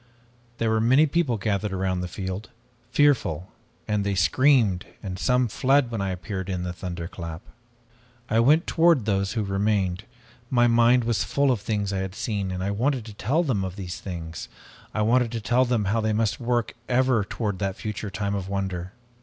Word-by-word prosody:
"There 115 -1 +1
were 110 0 +2
many 130 +7 +5
people 150 -6 +1
gathered 105 0 -1
around 95 -1 -1
the 90 - -3
field, 95 +3 -5 0.4
fearful, 125 - +2 0.4
and 105 -1 0
they 100 -1 -1
screamed 105 - +3 0.2
and 95 -2 -5
some 125 -1 +2
fled 130 +3 +2
when 110 -3 -2
I 100 - -1
appeared 95 +1 -4
in 90 -2 -2
the 90 -1 -3
thunderclap. 85 -1 -6 0.8
I 115 -2 +2
went 150 +8 +4
toward 165 -8 +3
those 100 -2 0
who 110 -3 -1
remained. 100 -1 0 0.4
My 120 -2 +4
mind 120 +1 +4
was 115 -1 0
full 140 -1 +2
of 120 -6 -1
things 105 -2 -2
I 95 - -1
had 95 0 -4
seen 100 -4 -2
and 90 0 -3
I 100 - -1
wanted 125 +3 0
to 110 - -9
tell 135 +12 0
them 120 - 0
of 95 -1 -4
these 95 -3 -6
things. 85 -4 -6 0.4
I 110 - 0
wanted 120 +1 +3
to 115 - -2
tell 120 +4 +2
them 120 -4 0
how 110 +4 +1
they 110 0 0
must 110 -1 0
work 120 -1 0 0.2
ever 125 -3 +3
toward 100 -1 -3
that 95 -2 -1
future 105 -1 -5
time 100 0 -2
of 95 -1 -3
wonder. 95 -2 -3
105 Hz, 190 wpm, -25 LUFS, 95-120 Hz, 0.8 s, many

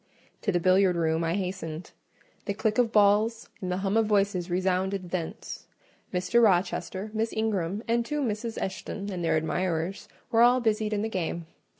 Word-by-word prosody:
To 205 - +1
the 175 - +1
billiard 185 +1 +4
room 165 -1 +1
I 165 +1 0
hastened: 180 -4 -4 0.5
the 200 - -2
click 220 +1 0
of 235 -2 +3
balls 215 +2 +3
and 185 -1 -3
the 180 - 0
hum 195 +2 +1
of 225 -1 +3
voices 195 -4 +1
resounded 185 0 0
thence; 170 -3 -5 0.4
Mr. 195 +6 +2
Rochester, 195 0 +1
Miss 225 +1 -1
Ingram, 205 -2 -1
the 235 +1 +2
two 290 +5 -2
Misses 225 -1 -3
Eshton, 200 +1 -4
and 180 -2 -4
their 165 - +2
admirers, 175 +4 -2 0.2
were 230 -1 +4
all 245 +2 +6
busied 220 -2 0
in 205 0 0
the - - 0
game. 170 -4 -3
195 Hz, 175 wpm, -27 LUFS, 180-220 Hz, 0.5 s, all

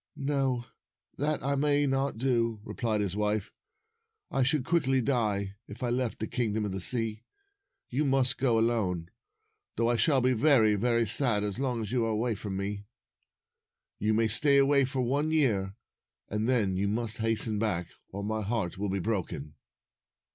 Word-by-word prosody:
''No; 135 -4 -1 0.5
that 150 0 -1
I 140 +1 0
may 145 +1 +2
not 135 -2 -1
do," 115 -3 0
replied 110 -3 -2
his 100 -2 -3
wife. 105 -1 -1 0.4
" 460 0 -52 0.3
I 135 - 0
should 135 +1 +1
quickly 135 -6 +1
die 105 -6 -1
if - - -9
I 120 - -1
left 125 -1 -1
the 110 - -3
Kingdom 110 -2 -2
of 100 - -3
the 95 0 -4
Sea. 115 +1 +5 0.7
You 135 +5 -1
must 135 -3 +1
go 125 -3 +2
alone, 100 -7 -1 0.6
though 115 +1 +1
I 120 - +1
shall 140 +1 +3
be 130 0 +2
very, 120 -4 +4
very 115 +3 +1
sad 110 -1 +4
as 105 +2 -3
long 125 -4 -2
as 105 - -6
you 125 -2 +1
are - - -1
away 110 +2 -1
from 100 -1 -5
me. 100 +1 -5 1.1
You 110 +1 +1
may 115 0 +2
stay 140 +6 +5
away 140 0 +4
for 130 0 -3
one 140 +5 0
year, 105 -12 +1 0.5
and 105 +3 -2
then 105 -7 +1
you 100 +1 0
must 110 +2 -1
hasten 110 -1 0
back, 90 -6 -2 0.2
or 100 +1 -6
my 110 +1 -2
heart 100 -4 -3
will 105 0 -2
be 95 - -1
broken." 85 -7 -3
115 Hz, 175 wpm, -28 LUFS, 105-130 Hz, 1.1 s, Sea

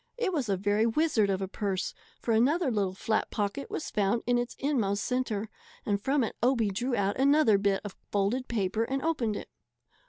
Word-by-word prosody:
It 445 -6 0
was 275 -9 -1
a 195 - +2
very 205 +3 +2
wizard 230 -5 +2
of 195 0 0
a - - -2
purse, 195 -1 -2 0.3
for 235 - -2
another 270 +7 +3
little 195 -4 0
flat 220 +3 0
pocket 210 +7 -3
was 315 - -4
found 210 +2 +1
in 245 0 +2
its 240 0 -3
inmost 220 -9 0
centre, 230 -5 -1 0.4
and 200 -1 0
from 270 +3 +2
it 225 - -3
Obie 235 -4 +2
drew 245 +6 -1
out 200 +2 0
another 275 -6 +5
bit 200 -1 +1
of 205 - -6 0.2
folded 210 +6 0
paper 215 -1 0
and 265 +3 -2
opened 255 -10 0
it. - - -7
225 Hz, 195 wpm, -29 LUFS, 200-265 Hz, 0.4 s, another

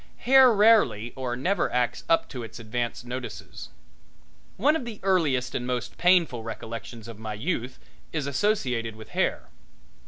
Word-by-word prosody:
Hair 260 0 +7
rarely 205 - +4
or 130 -2 -3
never 180 +11 0
acts 125 -1 0
up 165 - +3
to 125 - -6
its 115 0 -8
advance 120 +1 -3
notices. 125 0 -7 0.9
One 285 +10 +3
of 320 - -2
the 230 -3 -7
earliest 145 -10 +1
and 125 -1 -3
most 125 -1 -3
painful 175 -9 +3
recollections 115 0 -7
of 115 -2 -10
my 110 -1 -5
youth 125 - -3 0.3
is 155 -3 -2
associated 130 - 0
with 110 0 -12
hair. - - -1
125 Hz, 150 wpm, -26 LUFS, 115-185 Hz, 0.9 s, Hair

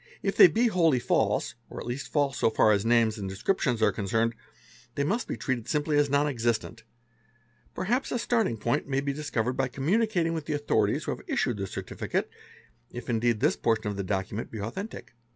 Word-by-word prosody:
If - - 0
they 385 - +10
be 235 -6 +1
wholly 170 - +3
false, 120 - +1 0.2
or - - -7
at - - -7
least 120 +3 -5
false 145 -2 +1
so - - +4
far 110 -1 +4
as 100 -1 +2
names 115 -2 +3
and 95 -1 -4
descrip 100 - 0
jlons 120 -5 0
are - - +5
concerned, 115 +3 0 0.6
they 140 - 0
must 210 +11 -1
be - - -4
treated 130 -5 -3
simply 150 0 0
as 145 -1 +3
non 140 +1 +3
existent; 115 -3 -1 0.9
perhaps 245 +8 -1
a - - 0
starting 225 - 0
point 120 +5 -1
may 135 -1 0
be 140 0 -2
discovered 130 -5 -2
by 130 0 0
communicating 170 - +1
with 160 -2 -4
the 155 - -1
authorities 110 -8 +1
who - - -2
have - - -5
issued 120 - 0
the 100 -1 -3
certificate, - - -3 0.6
if, 120 0 -6
indeed, 115 -1 +1
this - - +3
portion 110 -2 0
of 100 - -4
the 100 - -3
document 95 +3 -3
e 110 - -6
authentic. 120 - -6
125 Hz, 205 wpm, -28 LUFS, 110-150 Hz, 0.9 s, they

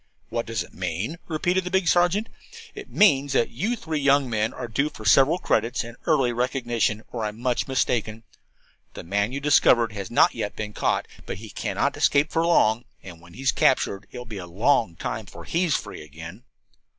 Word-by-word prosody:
"What 115 0 -3
does 115 0 -2
it - - -17
mean?" 95 - -4
repeated 175 +3 0
the 180 - -4
big 190 -1 +1
sergeant. 175 +6 +3 0.5
"It 405 0 -9
means 140 -9 +3
that 120 - +1
you 205 - -1
three 160 -8 -4
young 140 -1 +3
men 110 0 0
are 125 - -6
due 140 +6 0
for 110 -7 -12
several 135 +9 +5
credits 120 -8 0
and 120 0 -10
early 135 -7 +3
recognition, 120 -3 -1
or 115 -2 -4
I'm 105 +1 -4
much 125 0 -1
mistaken. 115 -4 -1 0.7
The - - -7
man 100 +5 0
you 140 - -3
discovered 125 -5 +4
has 100 -3 -6
not 120 - +4
yet 110 -3 -4
been 105 -1 -5
caught, - - 0 0.2
but - - -4
he 110 +1 -10
cannot - - -1
escape 145 +2 +2
for 165 - +1
long. 120 -9 +3 0.2
And 85 -3 -11
when 85 +1 -16
he 135 - -9
is 135 - +4
captured 100 -6 +1
it - - -9
will 125 - -7
be 110 -4 -7
a 90 - -8
long 105 +1 +1
time - - -4
before - - -11
he 175 +2 0
is 155 - +1
free - - -5
again. 80 - -11
120 Hz, 205 wpm, -24 LUFS, 105-145 Hz, 0.7 s, several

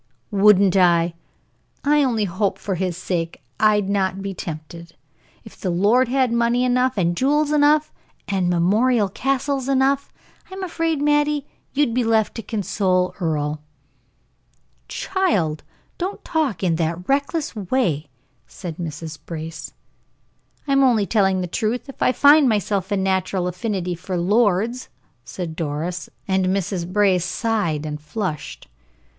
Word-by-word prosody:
"Wouldn't 200 -2 +5
I! 175 -2 +4 0.7
I 295 0 +4
only 235 -5 +1
hope 190 +2 -1
for 200 - -3
his 180 -1 -2
sake 170 -2 -3 0.2
I'd 210 -2 +3
not 195 -1 0
be 200 -1 -3
tempted. 165 0 -8 0.5
If - - -13
the 185 - -4
lord 210 +9 +3
had 255 -1 +1
money 235 +1 +2
enough, 250 -1 +1
and 175 -2 +1
jewels 290 - +2
enough, 300 +1 +3 0.3
and 190 -3 0
memorial 205 +6 +2
castles 270 +4 -1
enough 275 +1 +1 0.4
I'm 380 0 -7
afraid, 330 -4 -1
Mattie, 295 -1 +2 0.3
you'd 280 -4 +1
be 250 +1 +1
left 225 -2 +2
to 230 - -5
console 190 -3 0
Earle." 150 -3 -1 1.3
"Child, 200 - 0 0.4
don't 370 +3 -4
talk 280 - -1
in 170 -3 +1
that 170 +2 -2
reckless 285 +2 0
way," 180 - -1 0.4
said 170 -4 -8
Mrs. 160 -1 -6
Brace. 160 -2 -7 1.0
"I'm 275 -1 +3
only 235 -6 +3
telling 195 -3 +2
the - - -1
truth. 225 - -2
I - - +4
find 290 +3 +6
in - - +4
myself 205 -2 -1
a 200 - +2
natural 190 -1 0
affinity 180 0 -2
for 180 +1 -4
lords," 210 +5 +1 0.3
said 170 +1 -6
Doris, 165 +3 -3 0.2
and 190 -1 +1
Mrs. 185 -2 -2
Brace 195 -3 +3
sighed 185 -6 -1
and 150 0 -5
flushed. 155 0 -5
200 Hz, 135 wpm, -21 LUFS, 175-255 Hz, 1.3 s, find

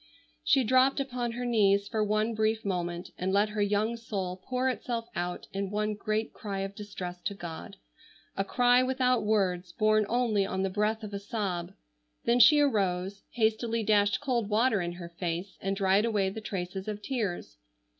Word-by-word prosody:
She 270 - +4
dropped 260 +4 +4
upon 245 -3 -2
her 245 +1 -4
knees 200 -4 +3
for 215 0 0
one 215 +2 +1
brief 220 0 0
moment 175 -2 -3
and 185 +1 0
let 205 +2 +3
her 210 0 -2
young 210 +3 +1
soul 190 -5 -4
pour 255 0 -1
itself 240 -2 -2
out 175 0 -3
in 195 0 -2
one 210 +1 -1
great 215 +1 -2
cry 200 -2 -4
of 195 0 -4
distress 185 -4 -7
to 200 - -2
God, 170 -4 -8 0.6
a 195 - 0
cry 245 +4 +4
without 255 -1 +1
words 185 -4 0
borne 215 -1 +3
only 230 -4 +2
on 190 0 -2
the 195 - -1
breath 215 +3 0
of 210 -1 -7
a 200 - -3
sob. 195 -4 -3 0.5
Then 240 +1 +3
she 300 +4 +8
arose, 195 -7 +1
hastily 225 0 +1
dashed 205 -1 +3
cold 245 -7 0
water 220 -1 +3
in 175 0 -3
her 175 -1 -8
face, 175 +2 -3
and 195 +1 -1
dried 195 +1 +3
away 205 -4 +1
the 220 - -7
traces 190 -1 -5
of 210 -1 -5
tears. 200 - -3
210 Hz, 180 wpm, -29 LUFS, 195-230 Hz, 0.6 s, she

